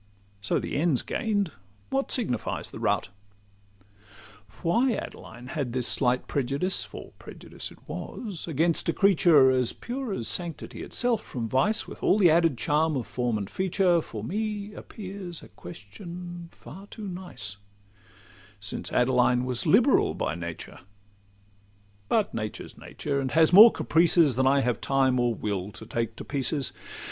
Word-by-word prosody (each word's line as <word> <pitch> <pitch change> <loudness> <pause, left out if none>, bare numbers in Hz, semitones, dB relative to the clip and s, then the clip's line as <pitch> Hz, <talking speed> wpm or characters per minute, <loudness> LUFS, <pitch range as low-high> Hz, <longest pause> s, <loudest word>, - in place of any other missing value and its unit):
So 100 - 0
the - - -3
end 155 -2 +2
's - - -2
gain'd, 205 -6 -1 0.4
what 270 0 0
signifies 220 - -2
the - - -8
route? - - 0 1.5
Why 235 +9 +3
Adeline 120 +3 -8
had 135 -6 -3
this 125 -2 0
slight 125 -1 +2
prejudice— 140 +7 -1
For - - -10
prejudice - - -7
it - - -15
was—against 170 - -2
a - - +2
creature 165 -9 +5
As 125 -2 +1
pure 250 -1 -5
as 120 - -3
sanctity 175 -3 -5
itself 240 -3 -1
from 120 -3 -5
vice, 135 - +1
With - - -10
all 195 - +4
the 180 -6 +6
added 165 -5 +3
charm 150 +5 +1
of 125 - -3
form 125 -3 -1
and 100 -2 -4
feature, 185 - +2
For 110 -8 -8
me 210 - -3
appears 190 -5 -8
a - - -13
question 170 - -9
far 195 +6 -12
too 210 -1 -8
nice, 175 - -7 1.0
Since 100 0 -5
Adeline 125 0 +3
was 125 -1 -2
liberal - - +4
by 70 - -2
nature; 85 -1 -7 1.3
But 215 -3 +1
nature 110 -2 -4
's - - -15
nature, 140 -2 -4
and 135 -1 -1
has 160 +2 +5
more 220 +5 +11
caprices 165 -4 +3
Than 130 +1 +2
I 140 +1 +4
have 120 -3 -1
time, 135 -2 +2
or 120 -1 +1
will, 100 -2 -3
to 90 - -10
take 115 -1 -3
to - - -8
pieces. 140 0 -1
150 Hz, 155 wpm, -27 LUFS, 125-185 Hz, 1.5 s, more